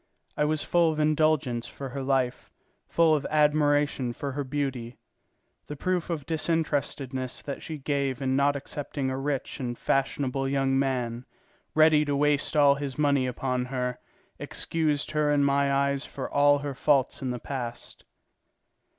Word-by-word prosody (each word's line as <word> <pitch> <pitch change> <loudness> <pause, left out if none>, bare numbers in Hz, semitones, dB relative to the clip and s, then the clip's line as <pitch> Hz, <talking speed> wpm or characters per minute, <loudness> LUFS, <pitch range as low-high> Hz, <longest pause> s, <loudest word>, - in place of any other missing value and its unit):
I 150 - +1
was 155 0 0
full 170 -2 +3
of 155 - -4
indulgence 150 -6 +1
for 135 -1 -7
her 135 +2 -5
life, 130 -2 0 0.4
full 165 -1 +3
of 150 - -1
admiration 145 -4 +2
for 140 +3 -4
her 145 +2 -3
beauty. 130 -4 -3 0.7
The 150 - -6
proof 180 +3 -1
of 155 -5 -3
disinterestedness 145 -5 -2
that 140 - -5
she 160 - -6
gave 140 -2 -1
in 130 -1 0
not 140 +1 +3
accepting 140 -1 -4
a 130 - -3
rich 140 0 -3
and 120 -2 -3
fashionable 135 0 0
young 135 -1 +1
man, 125 -3 -2 0.5
ready 155 -1 +6
to 145 -1 0
waste 145 +1 +1
all 145 -1 +6
his 140 -2 -5
money 140 -3 +2
upon 125 0 -2
her, 125 -1 -3 0.4
excused 155 -3 -1
her 150 -1 +1
in 145 -1 +3
my 140 0 +2
eyes 140 0 +1
for 135 - -6
all 145 0 +4
her 140 - -3
faults 135 0 +1
in 130 - -2
the 125 - -2
past. 120 -2 -6
140 Hz, 160 wpm, -27 LUFS, 130-150 Hz, 0.7 s, ready